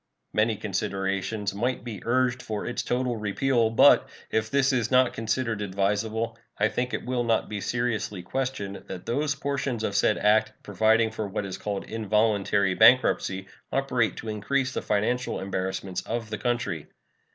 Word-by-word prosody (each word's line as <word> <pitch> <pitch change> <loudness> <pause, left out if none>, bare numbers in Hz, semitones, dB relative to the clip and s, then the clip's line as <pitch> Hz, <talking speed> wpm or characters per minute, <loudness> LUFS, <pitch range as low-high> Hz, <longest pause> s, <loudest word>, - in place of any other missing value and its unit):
Many 110 +1 +2
considerations 100 0 -2
might 125 +6 -1
be 110 -6 -6
urged 125 +1 +1
for 105 -4 -4
its 120 - -2
total 125 -1 -1
repeal, 115 +3 +1
but, 115 - +6 0.2
if 110 0 0
this 135 +1 +2
is 120 -3 +1
not 130 -1 +4
considered 115 0 -1
advisable, 105 +3 -1 0.2
I 105 +1 +3
think 125 +3 -2
it - - -3
will 125 -1 0
not 115 -1 +1
be 105 -1 -4
seriously 110 -6 -2
questioned 100 -3 -3
that 90 -2 -7
those 145 +4 0
portions 135 -4 -2
of 100 - -2
said 105 - +3
act 110 +1 +3
providing 110 +3 +3
for 110 -2 -4
what 100 +1 -3
is 95 - -6
called 100 -2 -3
involuntary 105 -3 +1
bankruptcy 95 -4 +4 0.3
operate 125 -5 +1
to 115 - -8
increase 130 +5 -1
the - - -2
financial 115 +4 0
embarrassments 95 -1 -3
of 115 -1 -4
the 110 - -3
country. 120 - -2
110 Hz, 160 wpm, -26 LUFS, 100-125 Hz, 0.3 s, but